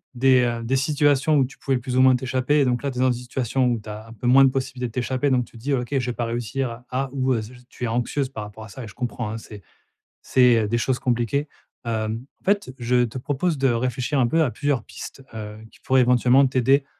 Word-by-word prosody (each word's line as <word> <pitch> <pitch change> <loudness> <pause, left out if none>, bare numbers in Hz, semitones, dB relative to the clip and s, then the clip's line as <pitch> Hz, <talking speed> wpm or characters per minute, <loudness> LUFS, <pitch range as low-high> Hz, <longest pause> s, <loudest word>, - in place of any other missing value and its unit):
des, 130 0 +4
heu, 120 -1 -1
des 125 +4 0
situations 145 +1 +2
où 135 - +4
tu 130 - -12
pouvais 135 -2 0
plus 125 +1 -4
ou - - +6
moins 130 0 +6
t'échapper, 130 +3 +1
et - - +3
donc 125 -1 0
là 140 - -2
tu 125 - -9
es - - 0
dans 130 0 +4
une - - +1
situation 125 +1 -1
où 120 -2 +1
tu 105 - -11
as 105 +1 -8
un 115 - -11
peu 115 +2 -9
moins 135 +2 +7
de - - +5
possibilité 130 -1 -3
de - - -10
t'échapper, 130 +3 -1
donc 125 -2 +2
tu 120 - -16
dis: 135 +5 -2
«OK, 125 -2 -1
je 135 -3 0
vais 125 - -2
pas 120 - -2
réussir 120 +2 -2
à 120 +1 -11
à» 135 +1 -2
ou 130 -1 +1
heu, 115 - 0
z 110 +3 -10
j 125 - -14
tu - - -10
es - - +1
anxieuse 125 +4 -1
par 110 -5 -6
rapport 105 +1 -10
à 110 - -11
ça 130 +5 -9
et - - -8
je 110 - -13
comprends 120 -2 -3
hein, 110 - -4
c'est 105 -2 -11 0.6
c'est, 125 -3 +4
heu, - - -2
des 120 +2 +1
choses 125 +1 0
compliquées. 125 +3 0 0.4
Hem, 110 +1 -3 0.2
en - - -34
fait, 200 -8 +1
je 125 0 +2
te 120 +1 -6
propose 145 +6 -1
de 135 0 +3
réfléchir 125 +3 -1
un 125 - +4
peu 160 +7 +2
à 145 - +1
plusieurs 145 -2 -1
pistes, 135 - -10
heu, 105 -1 -7
qui - - -21
pourraient 130 0 +3
éventuellement 125 +2 +4
t'aider 135 +2 +2
125 Hz, 275 wpm, -23 LUFS, 120-135 Hz, 0.6 s, moins